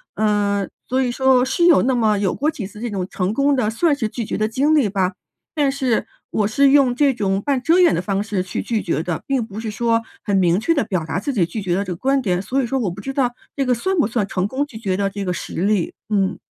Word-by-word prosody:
嗯， 205 -2 +1 0.2
所 260 +1 +1
以 255 - 0
说 255 0 +3
是 340 +6 +1
有 345 -3 +6
那 260 0 +2
么 220 -3 +2
有 195 -2 0
过 300 +3 0
几 210 -10 -6
次 210 +1 -12
这 240 - -3
种 190 -4 -3
成 185 +2 -1
功 280 +3 +2
的 240 -5 +1
算 290 +7 +2
是 225 -6 -2
拒 230 +1 -4
绝 - - -3
的 215 0 0
经 285 +7 +2
历 270 -9 +3
吧， 190 -1 0 0.4
但 290 -3 +2
是 260 -4 0 0.2
我 210 - +1
是 275 +6 +3
用 275 -3 +5
这 275 +2 +3
种 195 -4 -1
半 275 +2 0
遮 335 +3 +4
掩 355 - +5
的 165 - -1
方 195 +1 -1
式 205 -3 -2
去 185 - -4
拒 225 -3 -1
绝 165 - -1
的， 170 -1 -4
并 265 -4 0
不 215 0 -7
是 220 -1 -4
说 230 +1 +1 0.2
很 200 - -1
明 180 -1 +3
确 330 +10 +1
的 285 - +1
表 185 -7 -2
达 160 +2 -2
自 280 - -2
己 200 -10 +2
拒 175 +6 -5
绝 185 -3 -1
的 195 +3 0
这 180 - -3
个 - - -7
观 270 +9 +1
点， 180 -6 0
所 255 +8 -1
以 - - -1
说 270 - -1
我 210 -8 -1
不 180 - -9
知 270 +7 -5
道 260 -3 +1 0.2
这 275 - 0
个 250 - +2
算 375 +11 -1
不 315 - +3
算 215 -2 -1
成 185 -3 -1
功 265 +7 -1
拒 270 -6 -11
绝 195 -4 -2
的 200 0 0
这 200 0 -5
个 180 - -1
实 175 - -5
例？ 200 -2 +1 0.2
嗯。 195 -3 0
220 Hz, 300 characters per minute, -20 LUFS, 195-265 Hz, 0.4 s, 有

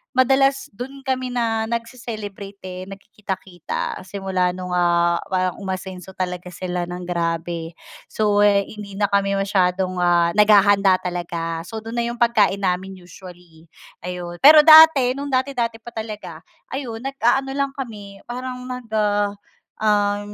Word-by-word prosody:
madalas 270 +1 +2
dun 265 +6 -9
kami 260 -1 -2
na 230 -3 -1
nagce-celebrate, 215 -4 -6
eh, 185 0 -7
nagkikita-kita 195 -3 -6
simula 190 -2 -1
nung, 180 -1 -6
ah, 170 -1 +2
parang 185 -1 -1
umasenso 190 -1 -6
talaga 180 -1 -4
sila 180 -1 -3
ng 180 0 -6
grabe. 170 -1 -3 0.3
So, 210 -1 +1
hindi 200 0 0
na 205 0 0
kami 200 0 +2
masyadong, 185 -2 0
ah, 175 -1 +3
naghahanda 205 -1 +5
talaga 170 -2 -4
so 225 - -6
dun 225 +1 -7
na - - +1
yung 235 - -4
pagkain 215 -4 +3
namin 190 +1 -1
usually, 175 -2 -15 0.4
ayun, 175 -1 -6
pero 300 +2 +9
dati, 310 -5 +8
nung 280 +1 -5
dati-dati 250 -4 -1
pa 240 - -9
talaga 210 -7 -7 0.3
ayun, 245 -5 -5
nag-aano 270 0 0
lang 275 -1 -1
kami, 205 -7 -8
parang 250 +1 -6
nag, 250 -2 -7 1.0
ah, 205 -1 +2
200 Hz, 135 wpm, -21 LUFS, 180-235 Hz, 1.0 s, pero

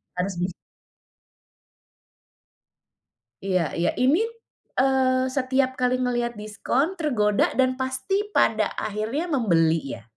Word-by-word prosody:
Harus 185 +1 -2
bis 180 +1 -1 2.9
Iya 185 -6 0
iya. 170 - +1
Ini, 275 - +3 0.6
eee, 260 -1 +3
setiap 260 0 0
kali 255 0 +1
ngelihat 240 -2 -1
diskon 225 - -1
tergoda 225 - +1
dan 255 -1 +3
pasti 260 +11 -2
pada - - +2
akhirnya 220 - -2
membeli 165 - +1
ya? - - -16
255 Hz, 100 wpm, -24 LUFS, 205-265 Hz, 2.9 s, Ini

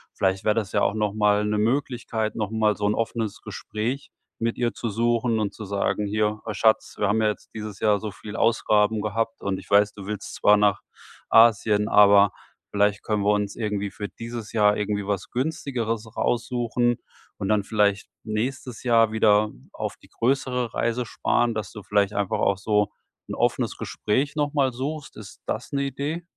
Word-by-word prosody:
vielleicht 95 0 0
wäre 105 - +3
das 110 -4 -1
ja - - +1
auch 100 - +2
nochmal 105 0 +2
‘ne 105 0 0
Möglichkeit, 115 -2 -1
nochmal 110 0 +1
so 105 - -1
‘n 105 - +1
offenes 115 -2 -3
Gespräch 120 +6 -4 0.3
mit 115 0 -1
ihr 120 -1 0
zu 115 - -4
suchen 115 +1 +1
und 105 -2 -1
zu 110 - -8
sagen: 100 +1 -1
„Hier, 105 +1 0
ah, 105 -2 -4
Schatz, 110 +2 +2
wir 105 - +1
haben 110 +2 +2
ja 110 - +3
jetzt 105 - -4
dieses 105 -3 -7
Jahr 105 -1 +3
so 110 - -4
viele 105 +2 -8
Ausgaben 110 -1 +3
gehabt 115 +2 -2
und 100 -1 -1
ich - - -14
weiß, 100 +1 +4
du 100 -2 -10
willst 105 -1 -5
zwar 105 0 +5
nach 105 -2 +2 0.5
Asien, 110 -2 +5
aber 100 -2 +6 0.4
vielleicht 105 0 +1
können 105 -2 0
wir 105 +1 +4
uns 105 -1 -1
irgendwie 105 -3 -2
für 105 -1 -5
dieses 115 0 -8
Jahr 105 -2 +4
irgendwie 105 -1 -2
was 100 -2 -2
Günstigeres 120 -5 -3
raussuchen 120 0 0 0.4
und 95 - -3
dann 105 -1 +2
vielleicht 100 -2 +1 0.2
nächstes 120 +3 -3
Jahr 115 -3 +4
wieder 105 -1 +3 0.2
auf - - -4
die - - -20
größere 125 -1 -1
Reise 120 +1 -1
sparen.“ 120 +1 +1
Dass 105 -4 -4
du 105 - -9
vielleicht 100 +1 +1
einfach 100 -2 0
auch 100 - +2
so 105 0 +1 0.4
‘n - - -5
offenes - - 0
Gespräch 135 +8 -1
nochmal 145 -3 +1
suchst. 145 +4 -5
Ist 105 -2 -11
das - - -3
‘ne 140 -1 0
Idee? 145 +5 -3
110 Hz, 180 wpm, -24 LUFS, 105-115 Hz, 0.5 s, aber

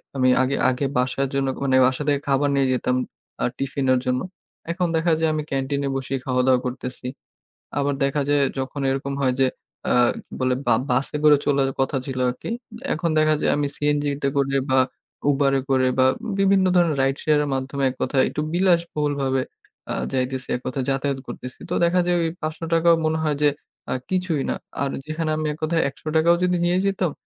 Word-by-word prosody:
আমি 130 -1 +3
আগে 135 +2 +1
আগে 130 +2 -1
বাসার 130 +2 0
জন্য 135 -1 0 0.2
মানে 135 -1 +2
বাসা 130 +3 -1
থেকে, 145 -1 +2
খাবার 140 +1 +2
নিয়ে 135 -1 +3
যেতাম 125 0 0 0.4
এ্যাঁ 125 - 0
টিফিনের 135 -2 +1
জন্য। 125 0 0 0.5
এখন 180 0 0
দেখা 165 +1 +1
যায় 160 -1 +2
আমি 155 -1 -1
ক্যান্টিনে 140 +1 -1
বসেই 135 0 -2
খাওয়া 125 -1 +1
দাওয়া 130 -1 +5
করতেছি। 125 0 -5 0.7
আবার 145 0 +1
দেখা 140 +2 0
যায় 145 -1 +3 0.2
যখন 135 +2 -4
এরকম 135 +1 -2
হয় 130 -2 +2
যে, 135 - +5 0.4
এ্যাঁ 120 -1 +4 0.3
বলে 130 -1 +1
বা - - +5 0.2
বাসে 130 +4 0
করে 150 -1 +8
চলার 140 -2 +2
কথা 135 +2 +1
ছিল 130 -1 -4
আরকি। 125 - -4 0.4
এখন 165 +1 -1
দেখা 155 0 +4
যায় - - +2
আমি 145 -1 0
সিএনজিতে 145 -1 0
করে 135 0 +1
বা 130 - +4 0.5
Uber 140 -1 +3
এ - - 0
করে 130 -1 +3
বা 130 - +6 0.3
বিভিন্ন 195 -1 +4
ধরনের 170 -4 +3
রাইড 135 +1 +1
শেয়ার 150 -1 +3
এর 145 - -3
মাধ্যমে, 135 +1 -2
এক - - -8
কথায় 130 -2 +2
একটু - - -4
বিলাসবহুলভাবে 150 -7 +1 0.5
এ্যাঁ - - -2
যাইতেছি, 130 0 -2
এক - - -8
কথা 130 +1 -2
যাতায়াত 135 0 -1
করতেছি। 125 +1 -8
তো - - 0
দেখা 175 +2 +3
যায় 175 0 +2
ওই 165 - +1
৳৫০০ 165 +1 0
ও - - +2
মনে 160 0 +1
হয় 150 -2 +1
যে, 145 - +6 0.4
এ্যাঁ 130 - -2
কিছুই 180 -6 0
না। - - 0 0.3
আর 140 - 0 0.2
যেখানে 155 0 -2
আমি 155 - -2
এক 150 - -9
কথায় 160 +1 +1
৳১০০ 155 +4 -1
ও - - +1
যদি 180 0 +2
নিয়ে 175 +1 +2
যেতাম। 190 -4 0
140 Hz, 195 wpm, -23 LUFS, 130-155 Hz, 0.7 s, করে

